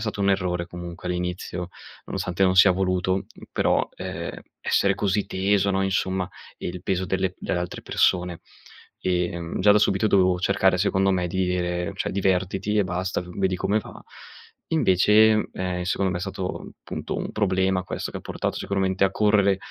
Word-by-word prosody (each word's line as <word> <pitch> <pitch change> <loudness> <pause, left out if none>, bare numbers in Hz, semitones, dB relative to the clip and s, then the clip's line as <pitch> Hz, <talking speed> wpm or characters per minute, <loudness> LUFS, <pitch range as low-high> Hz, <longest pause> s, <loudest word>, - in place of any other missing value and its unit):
stato 105 -2 -3
un 100 - +2
errore, 90 -3 0
comunque, 85 0 -7
all'inizio, 90 0 -3 0.4
nonostante 90 +1 -2
non 95 0 +2
sia 95 0 +8
voluto 95 0 0 0.3
però, - - +1
ehm, - - -5 0.2
essere 100 0 +2
così 100 +1 0
teso, 100 +1 +1
no, 95 0 +1
insomma 95 -1 0 0.3
il 90 0 -5
peso 95 -1 -1
delle 95 0 -1
delle 90 - -2
altre 90 0 -4
persone. 90 -1 +1 0.6
E, 90 -1 0
mhmm, 85 +1 -4
già 105 +2 +6
da 105 - +5
subito 100 0 +2
dovevo 95 -2 +3
cercare, 95 0 +3
secondo 95 0 +2
me, 90 -2 +1
di 95 +2 -1
ire: 90 0 -1
"Cioè - - -2
divertiti 95 +2 0
e 105 - +3
basta, 90 +1 -2
v 90 - -11
vedi 95 -1 +1
come 105 +4 +1
va." - - -10 0.7
Invece, 110 - +5
mhmm, 110 - +1
ehm, 90 -1 -2
secondo 95 +1 0
me 90 - -2
è - - -7
stato, 95 -1 -5
punto, - - -5
un - - -4
problema 95 -2 +1
questo 90 - -5
che - - -5
ha - - -11
portato - - -3
sicuramente 95 -1 0
a 95 - +2
correre 105 -2 +3
95 Hz, 175 wpm, -24 LUFS, 90-100 Hz, 0.7 s, sia